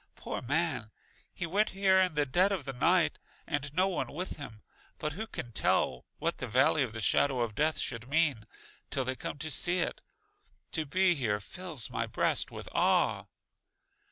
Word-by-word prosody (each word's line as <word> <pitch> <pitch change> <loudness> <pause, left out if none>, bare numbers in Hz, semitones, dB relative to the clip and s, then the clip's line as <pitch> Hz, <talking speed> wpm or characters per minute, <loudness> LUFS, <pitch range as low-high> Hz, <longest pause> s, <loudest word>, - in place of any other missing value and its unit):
Poor - - -5
man, 140 -4 -1 0.4
he 175 - -4
went 200 +6 +1
here 190 -1 +5
in 185 -4 +2
the 145 -1 +2
dead 180 +9 +3
of 180 -8 -2
the 135 - -4
night, 170 +7 +2 0.3
and 145 -2 -2
no 185 +5 +2
one 190 - -2
with 180 +5 -4
him; 115 -7 -9 0.3
but 150 -1 -3
who 220 +7 -5
can 120 - -6
tell 65 - +1
what - - -2
the 125 - -3
Valley 130 +6 +3
of 130 -4 0
the 115 - -6
Shadow 130 +5 +2
of 115 -3 -1
Death 155 +7 +1
should 115 -1 -2
mean, 145 -7 +2 0.5
till 135 -2 -1
they 130 +1 -1
come 145 - -5
to 155 +2 -2
see 175 +6 +3
it? 175 - -1 0.7
To 160 -3 -2
be 185 +4 +4
here 115 -9 0
fills 160 - -3
my - - -1
breast - - +1
with - - -8
awe! - - +2
150 Hz, 185 wpm, -31 LUFS, 125-175 Hz, 0.7 s, here